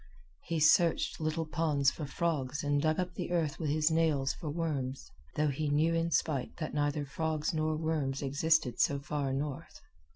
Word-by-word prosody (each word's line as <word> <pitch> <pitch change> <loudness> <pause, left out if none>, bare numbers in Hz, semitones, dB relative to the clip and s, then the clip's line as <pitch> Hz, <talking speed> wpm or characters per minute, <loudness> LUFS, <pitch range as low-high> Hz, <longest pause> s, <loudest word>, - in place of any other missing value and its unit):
He 165 -2 -1
searched 165 +2 +3
little 155 +1 -1
ponds 155 -4 +1
for 150 - -6
frogs 145 -4 -2
and 145 0 +1
dug 155 +2 +1
up 180 -1 -2
the - - -4
earth 165 -5 0
with 155 -3 -1
his 155 +2 +2
nails 155 -4 +2
for 160 - -6
worms, 145 -4 -3 0.2
though 150 -1 +2
he 145 +2 -2
knew 155 +3 +2
in 165 0 +1
spite 155 -4 -1
that 155 - -4
neither 145 0 0
frogs 155 +2 -2
nor 155 0 0
worms 150 -4 -1
existed 140 -2 +1
so 140 - +3
far 140 -1 -2
north. 140 +3 -4
155 Hz, 175 wpm, -31 LUFS, 140-160 Hz, 0.2 s, searched